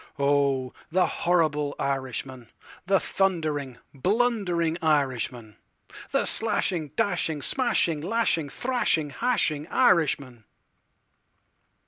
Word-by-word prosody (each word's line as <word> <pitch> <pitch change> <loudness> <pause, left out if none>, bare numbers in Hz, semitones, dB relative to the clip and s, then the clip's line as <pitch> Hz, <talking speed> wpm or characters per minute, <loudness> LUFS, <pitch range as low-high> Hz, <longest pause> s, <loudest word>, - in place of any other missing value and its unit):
Oh, 140 -2 +1 0.2
the 180 +3 +3
horrible 155 -4 0
Irishman, 130 -2 -4 0.4
The 195 0 +4
thundering, 155 -9 -1 0.2
blundering 180 - 0
Irishman—The 130 -8 -2
slashing, 190 -7 0
dashing, 175 -8 0
smashing, 175 - +1
lashing, 175 -5 0
thrashing, 200 - 0
hashing 160 - 0
Irishman. 145 - +1
155 Hz, 75 wpm, -26 LUFS, 140-190 Hz, 0.4 s, The